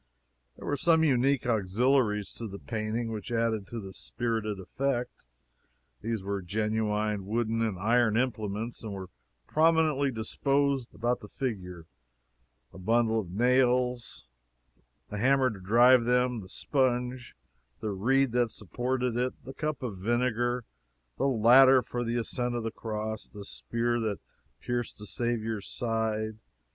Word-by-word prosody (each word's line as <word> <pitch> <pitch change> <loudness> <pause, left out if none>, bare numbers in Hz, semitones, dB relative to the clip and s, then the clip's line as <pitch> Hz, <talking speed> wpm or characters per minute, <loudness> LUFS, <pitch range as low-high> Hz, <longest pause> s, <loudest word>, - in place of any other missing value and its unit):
There - - -10
were 145 - 0
some 160 0 +4
unique 135 -2 +2
auxiliaries 110 0 +1
to 115 - -6
the 100 -1 -7
painting 115 +2 -3
which 110 0 -6
added 115 -3 0
to 115 -5 -6
its 95 - -10
spirited 110 -4 -2
effect. 125 - -3 0.7
These 115 -4 -2
were 100 0 -2
genuine 105 +1 -1
wooden 115 +1 0
and 110 -5 0
iron 115 +2 +3
implements, 110 -2 -2
and 110 -2 -5
were 95 -1 -7 0.3
prominently 155 -3 +3
disposed 135 +3 0
round - - -17
about 120 +2 +1
the 105 - -11
figure: 90 -10 -5 0.9
a - - -11
bundle 115 +3 +2
of 95 -5 -5
nails; 125 +3 +1 0.9
the 105 - -3
hammer 130 +1 +3
to 100 - -9
drive 120 +5 +5
them; 125 0 +2
the 95 -3 -10
sponge; 125 -1 -1 0.4
the 110 - -3
reed 130 +7 +2
that 120 -1 +2
supported 125 +4 -2
it; 125 +1 0
the 135 - -7
cup 155 -2 -3
of 105 -7 -4
vinegar; 120 +2 0 0.5
the - - +2
ladder 130 +2 +6
for 120 0 -3
the 120 0 -2
ascent 120 +1 -2
of 120 - -2
the 115 - -2
cross; 110 -1 -5
the 100 -1 -9
spear 120 +3 -1
that 110 -3 -2 0.4
pierced 120 -1 -3
the 105 - -9
Saviour's 115 -2 -2
side. 110 -2 -2
115 Hz, 145 wpm, -29 LUFS, 105-125 Hz, 0.9 s, ladder